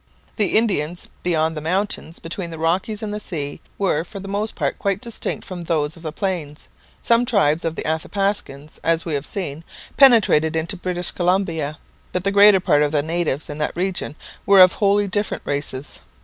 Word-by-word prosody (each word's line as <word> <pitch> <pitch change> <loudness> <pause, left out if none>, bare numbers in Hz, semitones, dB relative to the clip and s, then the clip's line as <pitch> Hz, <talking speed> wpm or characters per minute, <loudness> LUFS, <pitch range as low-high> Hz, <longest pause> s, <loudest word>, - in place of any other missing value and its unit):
The 210 -3 +2
Indians 180 -7 0
beyond 160 -2 0
the 150 - -4
mountains, 180 0 -1
between 170 +1 -6
the 165 - -7
Rockies 185 +7 -1
and 210 -1 -3
the 210 - -3
sea, 145 -8 -5 0.2
were 180 -6 +1
for 200 +3 -9
the 195 - -8
most 205 +2 -3
part - - -2
quite 200 -1 0
distinct 235 -3 -4
from 180 -2 -7
those 160 -2 -1
of 165 - -14
the 160 -2 -4
plains. 160 -5 -4 0.4
Some 235 +1 +4
tribes 195 - +2
of 165 -1 -2
the - - -4
Athapascans, 160 -3 -2
as 165 0 +1
we 165 - -3
have 140 0 -2
seen, 165 -5 -5 0.3
penetrated 205 - +5
into 165 +5 0
British 180 -1 -2
Columbia, 170 -5 0 0.4
but 180 - -1
the 195 - +1
greater 200 -1 +7
part 145 -5 +3
of 150 -1 +2
the 145 -2 +1
natives 160 -3 -1
in 150 -1 -7
that 150 - -2
region 180 -4 -2 0.3
were 195 -1 +7
of 185 - +5
wholly 205 0 +2
different 205 +2 -2
races. 140 -1 -4
175 Hz, 190 wpm, -21 LUFS, 155-200 Hz, 0.4 s, greater